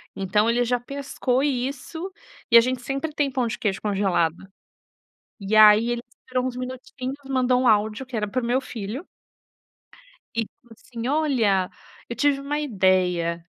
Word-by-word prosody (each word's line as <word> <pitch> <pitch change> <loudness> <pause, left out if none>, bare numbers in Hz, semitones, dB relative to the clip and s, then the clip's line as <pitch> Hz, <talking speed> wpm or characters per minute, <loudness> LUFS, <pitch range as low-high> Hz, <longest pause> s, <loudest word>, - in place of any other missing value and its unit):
Então 210 +3 +1
ele 240 +1 +2
já 245 +1 0
pescou 265 0 -2
isso, 280 +6 -3 0.4
e 235 - +8
a - - +9
gente 255 +1 -2
sempre 275 +5 -3
tem 290 -2 0
pão 255 -2 0
de 225 - -4
queijo 195 -3 -1
congelado. 190 -5 +1 1.1
E 200 +2 -1
aí 215 +2 +7
ele 240 0 -2 0.3
tirou 255 0 0
uns 255 - -3
minutinhos 255 +1 -6
mandou 255 -1 +2
um 255 - +2
áudio 215 +3 +2
que 255 -2 -8
era 210 -1 -1
para 255 +5 -2
o 235 - -4
meu 250 +3 +1
filho 230 - -6 1.3
e 230 - +1
ele 220 - -4
falou 235 -1 -17
assim: 235 +1 -7
"Olha, 245 -11 +2 0.4
eu 235 - -4
tive 285 -1 +2
uma 290 +2 -2
ideia". 185 - +1
245 Hz, 170 wpm, -24 LUFS, 210-265 Hz, 1.3 s, a